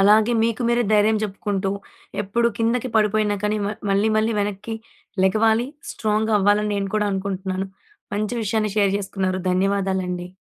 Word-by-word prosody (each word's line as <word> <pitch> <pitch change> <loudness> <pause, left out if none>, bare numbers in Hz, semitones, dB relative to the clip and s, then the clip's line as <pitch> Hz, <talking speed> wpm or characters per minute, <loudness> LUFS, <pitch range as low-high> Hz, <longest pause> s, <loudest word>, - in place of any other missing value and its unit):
అలాగే 215 +4 +5
మీకు 230 +1 -1
మీరే 240 0 +2
ధైర్యం 215 +1 +4
చెప్పుకుంటూ 195 -1 -2 0.5
ఎప్పుడు 235 +4 +1
కిందకి 235 +2 0
పడిపోయిన 210 -1 +2
కానీ 210 +1 +1
మ - - 0 0.2
మళ్ళి 200 +3 +3
మళ్ళి 220 +1 +1
వెనక్కి 205 +2 -3 0.5
లెగవాలి 220 +4 +3 0.3
స్ట్రాంగ్ 220 0 0
అవ్వాలి 205 +1 +3
అని 210 - -1
నేను 195 -1 -2
కూడా 210 - +1
అనుకుంటున్నాను. 190 0 -3 0.5
మంచి 215 +3 -1
విషయాన్ని 215 -1 0
షేర్ 200 -2 +3
చేసుకున్నారు. 190 -1 -2
ధన్యవాదాలండి. 190 -2 0
210 Hz, 145 wpm, -22 LUFS, 195-220 Hz, 0.5 s, అలాగే